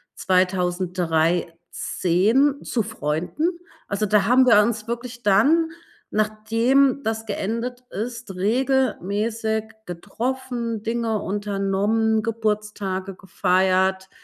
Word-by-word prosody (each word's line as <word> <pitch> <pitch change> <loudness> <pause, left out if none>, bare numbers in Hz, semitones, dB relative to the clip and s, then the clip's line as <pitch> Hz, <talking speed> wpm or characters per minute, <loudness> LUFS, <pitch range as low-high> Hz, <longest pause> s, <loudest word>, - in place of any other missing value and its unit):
2013 180 - +1
zu 230 - -1
Freunden. 175 - -2 0.4
Also, 200 +1 -1
da 210 -1 +3
haben 255 +4 +5
wir 220 -4 +7
uns 215 0 -1
wirklich 240 0 -5
dann, 280 +12 +4 0.4
nachdem 225 +6 +2
das 220 0 -2
geendet 230 +4 -3
ist, 230 -1 -5
regelmäßig 220 -1 0 0.2
getroffen, 235 +5 -4
Dinge 230 -1 -1
unternommen, 205 +2 0
Geburtstage 210 -4 -2
gefeiert, 190 0 +1
215 Hz, 85 wpm, -23 LUFS, 190-235 Hz, 0.4 s, wir